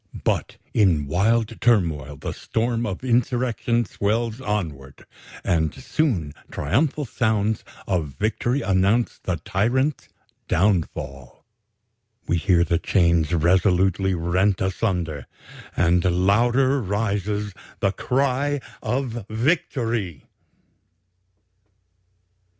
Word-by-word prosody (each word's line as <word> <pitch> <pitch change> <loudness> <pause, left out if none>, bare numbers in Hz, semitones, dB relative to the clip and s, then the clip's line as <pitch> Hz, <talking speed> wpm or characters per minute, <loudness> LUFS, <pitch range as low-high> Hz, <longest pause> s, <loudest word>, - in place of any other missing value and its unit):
But - - -1 0.2
in 90 -9 +3
wild 110 +9 +1
turmoil 80 - +2
the - - -5
storm 115 +1 -1
of 100 +4 -5
insurrection 120 -1 +1
swells 110 +5 -1
onward; 85 - -4 0.4
and 80 -2 +1
soon 125 - -1 0.2
triumphal 140 - 0
sounds 110 -3 0 0.2
of 80 -8 -2
victory 120 +5 0
announce 100 +5 +2
the 90 -2 -2
tyrant's 120 - 0 0.4
downfall. 80 - -1 0.8
We 85 - +2
hear 85 -1 +3
the 85 -1 +1
chains 85 -5 +2
resolutely 95 +2 +2
rent 90 +4 +1
asunder, 90 - -2 0.5
and 85 0 +3
louder 120 +9 +3
rises 105 0 -1 0.3
the 100 - +2
cry 140 +5 0 0.2
of 120 -5 -3
victory." 115 - -1
100 Hz, 90 wpm, -23 LUFS, 85-120 Hz, 0.8 s, in